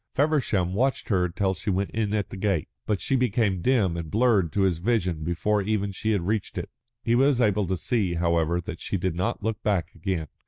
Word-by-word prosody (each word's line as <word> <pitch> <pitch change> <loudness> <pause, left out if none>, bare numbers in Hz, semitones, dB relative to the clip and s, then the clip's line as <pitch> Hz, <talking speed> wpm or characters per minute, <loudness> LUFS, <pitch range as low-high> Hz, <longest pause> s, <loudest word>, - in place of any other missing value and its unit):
Feversham 130 - +1
watched 135 +6 0
her 90 -4 +2
till 95 +2 0
she 95 +3 -5
went 95 +1 0
in 110 -2 -1
at 105 -2 -1
the - - -6
gate, 95 -5 0 0.2
but 105 -3 +1
she 135 - 0
became 110 -7 +1
dim 105 -7 +2
and 85 -2 -5
blurred 105 -5 +2
to 100 - +1
his 95 -4 +2
vision 90 -6 0
before 95 +6 0
even 100 0 -1
she 110 +3 -3
had 100 -5 +1
reached 105 0 -2
it. - - -4 0.3
He 115 - +1
was 135 +1 +4
able 105 -4 +2
to 95 +1 -1
see, 95 -1 0
however, 85 0 +1
that 85 0 -7
she 100 - -2
did 90 -1 -1
not 90 +3 -2
look 110 0 -2
back 100 -5 0
again. 85 -1 -3
100 Hz, 220 wpm, -26 LUFS, 90-110 Hz, 0.3 s, was